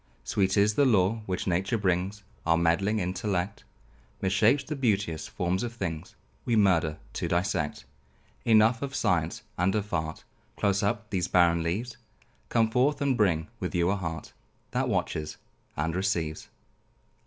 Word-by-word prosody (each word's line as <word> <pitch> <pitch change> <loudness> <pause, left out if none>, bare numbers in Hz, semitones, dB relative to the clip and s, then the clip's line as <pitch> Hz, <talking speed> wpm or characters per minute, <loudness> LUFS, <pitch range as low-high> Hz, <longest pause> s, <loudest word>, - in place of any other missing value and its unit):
Sweet 95 0 +1
is 105 +1 +4
the 145 - +3
lore 110 -3 +3
which 90 -1 -2
nature 95 +5 0
brings; 95 +1 -1 0.2
Our 80 0 +3
meddling 85 +6 +2
intellect 95 +1 -2 0.6
Mishapes 105 +8 +3
the 150 - -4
beauteous 100 - 0
forms 90 +2 -1
of 120 -1 -3
things; 85 -6 -5 0.3
We 120 - +1
murder 85 -7 +3 0.2
to - - -2
dissect. 85 -3 -1 0.6
Enough 115 +1 +4
of 140 -1 -4
science 85 -6 0 0.2
and 90 +3 +2
of 105 -2 -2
art; 80 -2 -2 0.3
Close 100 -1 +1
up 105 +1 -1
these 95 -2 0
barren 85 -2 +4
leaves; 110 +9 -3 0.5
Come 115 -2 +2
forth, 130 +5 +2
and 140 -2 +1
bring 85 -8 +2
with - - -3
you 85 +1 +2
a - - +1
heart 80 -5 -5 0.4
That - - 0
watches 75 -1 -2 0.4
and 80 +3 -1
receives. 85 -5 -1
95 Hz, 150 wpm, -28 LUFS, 85-110 Hz, 0.6 s, is